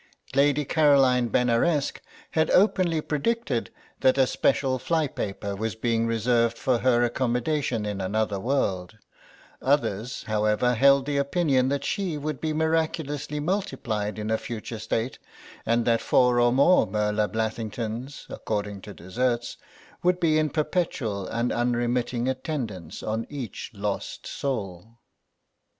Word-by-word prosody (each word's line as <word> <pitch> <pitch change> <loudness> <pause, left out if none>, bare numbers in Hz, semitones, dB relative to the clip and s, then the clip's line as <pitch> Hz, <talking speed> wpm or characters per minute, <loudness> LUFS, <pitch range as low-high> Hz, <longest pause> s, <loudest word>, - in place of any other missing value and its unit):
Lady 145 +1 +3
Caroline 135 -5 +4
Benaresq 125 +7 +1 0.3
had 160 0 +2
openly 180 -5 +3
predicted 150 - -1 0.3
that 130 +1 +3
a 135 - +5
special 130 0 +1
fly 160 +1 +1
paper 100 -6 -4
was 110 +1 -3
being 115 0 0
reserved 115 0 +1
for 125 -3 +1
her 120 -1 +3
accommodation 125 0 0
in 100 -2 -3
another 105 +1 -1
world; 100 -6 -1 0.6
others, 125 -4 0
however, 110 +3 +1
held 140 +3 +5
the 145 0 -1
opinion 140 -2 +2
that 140 0 -1
she 190 -7 -1
would 150 -1 -4
be 155 - -1
miraculously 155 -2 -1
multiplied 135 - -2
in 105 +1 -3
a 110 - +1
future 115 -1 -6
state, 115 +3 -2 0.5
and 115 +1 +2
that 115 -1 +2
four 125 -1 +3
or 120 0 +4
more 140 +8 +5
Merla 105 0 0
Blathlingtons, 110 +3 -4
according 105 -2 -4
to 105 0 -10
deserts, 120 +6 -2 0.5
would 180 0 +2
be 155 -3 +3
in 155 -1 +1
perpetual 150 - -1
and 115 +1 -1
unremitting 120 0 0
attendance 125 - -4
on 110 +1 -2
each 135 -8 -6
lost 100 0 -4
soul. 110 -5 -4
125 Hz, 130 wpm, -26 LUFS, 110-145 Hz, 0.6 s, a